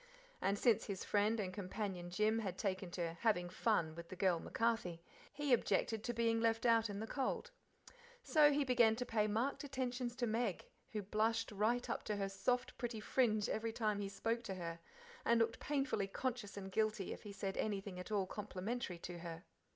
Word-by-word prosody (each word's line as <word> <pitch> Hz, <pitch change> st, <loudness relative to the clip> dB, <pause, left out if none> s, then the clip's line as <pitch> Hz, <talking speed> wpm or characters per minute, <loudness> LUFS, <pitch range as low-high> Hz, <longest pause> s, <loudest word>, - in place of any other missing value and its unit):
And, 200 Hz, +1 st, +2 dB
since 225 Hz, 0 st, +4 dB
his 195 Hz, -2 st, -4 dB
friend 210 Hz, +2 st, +2 dB
and 185 Hz, -3 st, -2 dB
companion 190 Hz, -2 st, -4 dB
Jim 215 Hz, +4 st, +2 dB
had 190 Hz, -4 st, -3 dB
taken 190 Hz, -3 st, -1 dB
to 170 Hz, -1 st, -2 dB
"having 190 Hz, -6 st, +2 dB
fun" 175 Hz, -4 st, +1 dB
with 170 Hz, +1 st, -9 dB
"the -, -, -6 dB
girl 185 Hz, -2 st, +2 dB
MacCarthy," 225 Hz, -5 st, 0 dB, 0.3 s
he 290 Hz, -2 st, +1 dB
objected 220 Hz, -1 st, +2 dB
to 240 Hz, -, -1 dB
being 230 Hz, -1 st, +2 dB
left 225 Hz, 0 st, +2 dB
out 230 Hz, -2 st, +5 dB
in 200 Hz, 0 st, -4 dB
the 220 Hz, -, -2 dB
cold. 275 Hz, -, -2 dB, 0.7 s
So 305 Hz, -8 st, +6 dB
he 290 Hz, 0 st, +2 dB
began 240 Hz, -4 st, +5 dB
to 250 Hz, +2 st, -3 dB
pay 215 Hz, -3 st, +2 dB
marked 230 Hz, +9 st, 0 dB
attentions 255 Hz, -3 st, -2 dB
to 245 Hz, -1 st, 0 dB
Meg, 225 Hz, -4 st, 0 dB, 0.3 s
who 210 Hz, -2 st, -2 dB
blushed 220 Hz, +3 st, +1 dB
right 220 Hz, +4 st, +1 dB
up -, -, -2 dB
to 210 Hz, -, -1 dB
her 195 Hz, -1 st, -1 dB
soft, 220 Hz, +6 st, 0 dB
pretty 235 Hz, -3 st, -2 dB
fringe 215 Hz, -2 st, +2 dB
every 225 Hz, +1 st, -1 dB
time 215 Hz, -2 st, 0 dB
he 200 Hz, -1 st, -2 dB
spoke 225 Hz, +4 st, -1 dB
to 195 Hz, -, -3 dB
her, 170 Hz, -2 st, -5 dB, 0.4 s
and 235 Hz, 0 st, +4 dB
looked 230 Hz, 0 st, +1 dB
painfully 270 Hz, -8 st, 0 dB
conscious 225 Hz, -1 st, -3 dB
and 190 Hz, -1 st, -6 dB
guilty 215 Hz, -1 st, 0 dB
if -, -, -10 dB
he 205 Hz, -, -8 dB
said 195 Hz, -1 st, -3 dB
anything 195 Hz, -3 st, -2 dB
at 180 Hz, -, -7 dB
all 200 Hz, -3 st, +2 dB
complimentary 205 Hz, 0 st, -4 dB
to 175 Hz, 0 st, -7 dB
her. 165 Hz, 0 st, -7 dB
215 Hz, 195 wpm, -38 LUFS, 195-235 Hz, 0.7 s, So